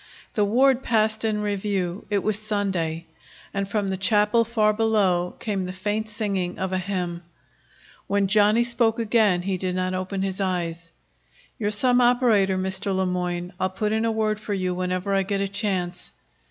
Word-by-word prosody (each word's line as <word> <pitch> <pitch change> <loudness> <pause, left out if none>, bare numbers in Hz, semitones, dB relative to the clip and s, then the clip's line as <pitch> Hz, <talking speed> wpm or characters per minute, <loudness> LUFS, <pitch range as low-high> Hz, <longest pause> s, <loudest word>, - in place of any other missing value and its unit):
The 210 - +2
ward 255 +5 +3
passed 220 -2 +1
in 215 -1 0
review. 195 -3 -2
It 205 -2 0
was 215 -1 0
Sunday, 190 -6 -2 0.5
and 200 0 -2
from 205 -2 -1
the 190 - -2
chapel 210 +4 +3
far 215 -2 +2
below 205 -5 +1
came 200 -4 -2
the - - -4
faint 205 +4 -2
singing 200 -5 -2
of 190 0 -3
a 185 - +1
hymn. 180 -2 -3 0.9
When 200 0 +2
Johnny 210 +3 +4
spoke 235 -1 +1
again 215 -5 +2
he 190 0 -1
did 180 0 -2
not 185 0 -1
open 185 +1 -3
his 195 0 -3
eyes. 170 -3 -2 0.7
"You're 205 -2 0
some 245 +4 +3
operator, 235 -6 +3
Mr. 190 +1 -1
Le 190 0 +1
Moyne. 180 0 -2
I'll 185 - +1
put 210 +3 -2
in 220 +1 +1
a 230 - +1
word 215 -1 0
for 210 -1 -3
you 185 -1 -1
whenever 185 +2 -2
I 195 - +3
get 195 +1 -1
a 200 - 0
chance." 190 -3 -3
200 Hz, 180 wpm, -24 LUFS, 185-215 Hz, 0.9 s, Johnny